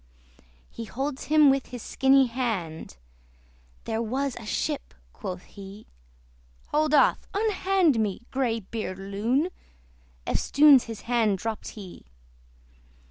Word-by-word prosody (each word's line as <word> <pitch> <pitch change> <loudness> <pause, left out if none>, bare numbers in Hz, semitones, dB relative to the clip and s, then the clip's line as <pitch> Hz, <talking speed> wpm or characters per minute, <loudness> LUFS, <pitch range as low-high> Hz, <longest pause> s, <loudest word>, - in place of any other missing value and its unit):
He 230 - -7
holds 270 +4 -4
him 300 -2 +6
with 270 -1 -1
his 245 -2 -8
skinny 270 0 +4
hand, 220 - -4 0.9
"There 225 0 -2
was 260 +4 -2
a 225 - -9
ship," - - -3 0.2
quoth 180 -1 -6
he. 200 +1 -12 0.8
"Hold 305 0 +2
off! 280 - +3
unhand 385 - +2
me, 215 +1 -2
grey 240 -4 0
beard 195 -2 -5
loon!" 215 - -1 0.8
Eftsoons 285 -3 +5
his 225 -2 -8
hand 230 -4 +1
dropt 220 +2 -5
he. 190 - -11
235 Hz, 115 wpm, -26 LUFS, 210-275 Hz, 0.9 s, him